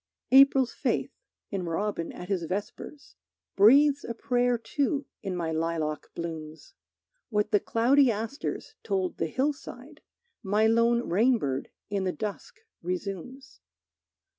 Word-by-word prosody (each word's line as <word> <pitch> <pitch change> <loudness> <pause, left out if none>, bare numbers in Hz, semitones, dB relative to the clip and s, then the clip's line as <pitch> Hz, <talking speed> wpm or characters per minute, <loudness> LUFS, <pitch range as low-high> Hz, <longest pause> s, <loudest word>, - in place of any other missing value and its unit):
April's 270 -1 +6
faith, - - -1 0.4
in 190 -3 -3
robin 170 0 -2
at 180 - -9
his 185 -4 -1
vespers, 205 - -6 0.4
Breathes 280 +8 +6
a 235 - -5
prayer 245 +1 +1
too 280 +4 -1 0.2
in 190 -2 -4
my 165 -2 -2
lilac 160 -1 -2
blooms. 160 -2 -7 0.6
What 210 -2 0
the 205 - +4
cloudy 255 +6 +3
asters 225 +5 -4
told 190 -3 -2
the 165 - 0
hillside, 275 - -4 0.4
My 210 +1 +2
lone 230 +1 +3
rainbird 190 - +1 0.2
in 200 -2 0
the 185 - +1
dusk 215 - -6 0.2
resumes. 195 +8 -6
210 Hz, 120 wpm, -28 LUFS, 180-255 Hz, 0.6 s, April's